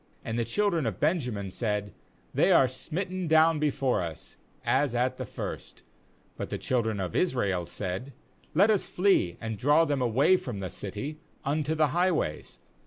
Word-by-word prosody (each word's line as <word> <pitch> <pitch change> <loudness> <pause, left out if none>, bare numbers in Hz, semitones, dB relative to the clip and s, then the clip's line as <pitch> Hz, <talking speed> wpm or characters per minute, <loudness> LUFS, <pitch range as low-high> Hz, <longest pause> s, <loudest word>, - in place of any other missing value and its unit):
32 - - -6
And 115 - -1
the 115 - 0
children 170 - +1
of 105 -5 -3
Benjamin 125 - 0
said: 105 -3 -2 0.4
'They - - +3
are 130 - +6
smitten 180 +7 -3
down 160 0 +5
before 135 -6 +1
us, 80 -3 -7 0.3
as 135 -2 +2
at 125 +1 +1
the - - -5
first/ - - -7 0.5
But - - -4
the - - -3
children 110 -5 0
of 90 -3 -3
Israel 100 - +1
said: 95 +7 -4 0.4
'Let 200 +6 +5
us 205 - 0
flee, 180 - +2
and 110 -2 -5
draw 150 +6 +4
them 145 -4 0
away 130 +10 +4
from 120 - -6
the 95 -2 -5
city 135 +10 -6 0.3
unto 150 +2 0
the 155 -2 +3
highways.' 175 - 0
130 Hz, 170 wpm, -28 LUFS, 105-160 Hz, 0.5 s, are